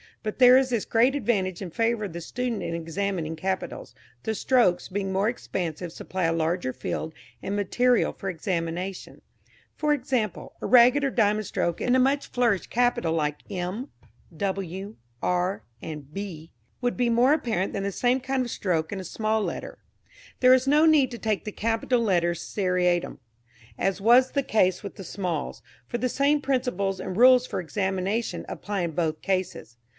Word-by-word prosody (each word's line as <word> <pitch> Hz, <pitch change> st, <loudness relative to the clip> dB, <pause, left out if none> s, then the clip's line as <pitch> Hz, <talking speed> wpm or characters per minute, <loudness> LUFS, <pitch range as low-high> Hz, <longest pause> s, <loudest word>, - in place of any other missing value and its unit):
But 215 Hz, -1 st, -4 dB
there 250 Hz, 0 st, +8 dB
is 265 Hz, -1 st, +2 dB
this 235 Hz, -4 st, -1 dB
great 240 Hz, +4 st, +3 dB
advantage 195 Hz, -9 st, -1 dB
in 180 Hz, -, -5 dB
favour 230 Hz, +3 st, 0 dB
of 190 Hz, -, -7 dB
the 170 Hz, -, -6 dB
student 245 Hz, +5 st, -3 dB
in -, -, -3 dB
examining 170 Hz, 0 st, -3 dB
capitals 190 Hz, +4 st, -4 dB, 0.3 s
the 220 Hz, -, -1 dB
strokes 235 Hz, -7 st, +2 dB
being 195 Hz, 0 st, -3 dB
more 195 Hz, +3 st, +1 dB
expansive 175 Hz, -7 st, -4 dB
supply 185 Hz, +2 st, -5 dB
a 165 Hz, -, +2 dB
larger 165 Hz, -4 st, -1 dB
field 155 Hz, +5 st, -4 dB, 0.3 s
and 200 Hz, -, -3 dB
material 245 Hz, +4 st, +2 dB
for 195 Hz, -, -5 dB
examination. 180 Hz, +1 st, -4 dB, 0.5 s
For 300 Hz, -1 st, +1 dB
example, 250 Hz, -, -2 dB
a -, -, -4 dB
ragged 250 Hz, +3 st, +6 dB
or 275 Hz, -, +1 dB
diamond 215 Hz, -3 st, +1 dB
stroke 170 Hz, -, -1 dB
in 250 Hz, -, +2 dB
a -, -, +4 dB
much 275 Hz, +2 st, +2 dB
flourished 235 Hz, -6 st, 0 dB
capital 245 Hz, -9 st, +1 dB
like 150 Hz, -2 st, -1 dB
M, 190 Hz, +8 st, -4 dB, 0.5 s
W, 195 Hz, +2 st, -4 dB, 0.3 s
R 180 Hz, -, 0 dB, 0.2 s
or 160 Hz, -, -5 dB
B 160 Hz, +2 st, -8 dB, 0.3 s
would 245 Hz, -1 st, -1 dB
be 245 Hz, -1 st, +2 dB
more 245 Hz, +4 st, +4 dB
apparent 225 Hz, -, -1 dB
than 195 Hz, -, -2 dB
the 200 Hz, -, -1 dB
same 245 Hz, +6 st, +1 dB
kind 260 Hz, 0 st, -1 dB
of 240 Hz, -, -5 dB
stroke 165 Hz, -5 st, -1 dB
in 200 Hz, -, -4 dB
a -, -, -5 dB
small 215 Hz, +4 st, -1 dB
letter. -, -, -5 dB, 0.6 s
There 255 Hz, 0 st, +7 dB
is 260 Hz, +1 st, +3 dB
no 300 Hz, +3 st, +5 dB
need 295 Hz, -5 st, +4 dB
to 235 Hz, -, -7 dB
take 215 Hz, -2 st, -1 dB
the 210 Hz, -, -4 dB
capital 225 Hz, +4 st, 0 dB
letters 175 Hz, -5 st, +1 dB
seriatim, 180 Hz, -3 st, 0 dB, 0.6 s
as 195 Hz, +1 st, -1 dB
was 245 Hz, +4 st, +5 dB
the 280 Hz, -, 0 dB
case 185 Hz, -7 st, +2 dB
with 200 Hz, -, -7 dB
the 195 Hz, -, -8 dB
smalls, 175 Hz, -4 st, -4 dB, 0.2 s
for 240 Hz, -, -2 dB
the 255 Hz, -, 0 dB
same 285 Hz, +3 st, +2 dB
principles 245 Hz, -9 st, -1 dB
and 185 Hz, -, -5 dB
rules 255 Hz, +1 st, +6 dB
for -, -, -3 dB
examination 190 Hz, +4 st, -2 dB
apply 205 Hz, -2 st, -3 dB
in 170 Hz, -1 st, -1 dB
both 160 Hz, -1 st, -1 dB
cases. 185 Hz, -, -3 dB
200 Hz, 175 wpm, -26 LUFS, 180-245 Hz, 0.6 s, there